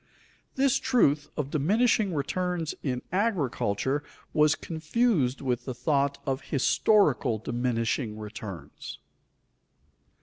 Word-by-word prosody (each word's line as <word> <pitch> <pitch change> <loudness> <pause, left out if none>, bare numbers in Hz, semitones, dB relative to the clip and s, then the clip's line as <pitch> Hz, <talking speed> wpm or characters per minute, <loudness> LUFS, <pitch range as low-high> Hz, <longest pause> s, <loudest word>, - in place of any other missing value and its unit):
_This 270 -1 +3
truth 155 - +2
of 145 -1 -2
diminishing 205 - +2
returns 175 +2 -2
in 125 -3 -2
agriculture 145 - 0 0.3
was 150 0 +4
confused 160 - 0
with 125 -3 -1
the 130 - -4
thought 140 0 +1
of 135 0 -2
historical 140 - +3
diminishing 115 0 -1
returns. 105 -3 -8
145 Hz, 95 wpm, -27 LUFS, 125-180 Hz, 0.3 s, was